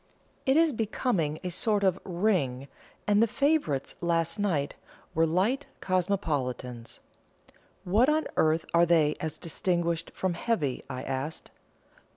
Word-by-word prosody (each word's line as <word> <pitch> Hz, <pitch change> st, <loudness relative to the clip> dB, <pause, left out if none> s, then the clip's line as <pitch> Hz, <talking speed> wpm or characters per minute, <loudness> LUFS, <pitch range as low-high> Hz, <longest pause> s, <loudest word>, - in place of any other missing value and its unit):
It 265 Hz, +3 st, +4 dB
is 325 Hz, -2 st, +4 dB
becoming 205 Hz, -, 0 dB
a 180 Hz, -, -2 dB
sort 205 Hz, +3 st, +1 dB
of 190 Hz, -1 st, +2 dB
'ring,' 170 Hz, -9 st, 0 dB, 0.4 s
and 205 Hz, +1 st, +4 dB
the 230 Hz, -, +5 dB
favourites 280 Hz, -, +1 dB
last 170 Hz, +3 st, 0 dB
night 165 Hz, -9 st, 0 dB, 0.4 s
were 165 Hz, +1 st, +3 dB
light 210 Hz, -, +1 dB
Cosmopolitans." 140 Hz, -, -2 dB, 0.8 s
"What 215 Hz, +9 st, +3 dB
on 310 Hz, +1 st, +2 dB
earth 160 Hz, +1 st, +2 dB
are 170 Hz, 0 st, +5 dB
they 155 Hz, -3 st, +4 dB
as 160 Hz, -2 st, -4 dB
distinguished 170 Hz, 0 st, -1 dB
from 185 Hz, -2 st, -1 dB
heavy?" 165 Hz, -, -1 dB
I 130 Hz, -1 st, -5 dB
asked. 135 Hz, +4 st, -4 dB
170 Hz, 130 wpm, -28 LUFS, 150-205 Hz, 0.8 s, the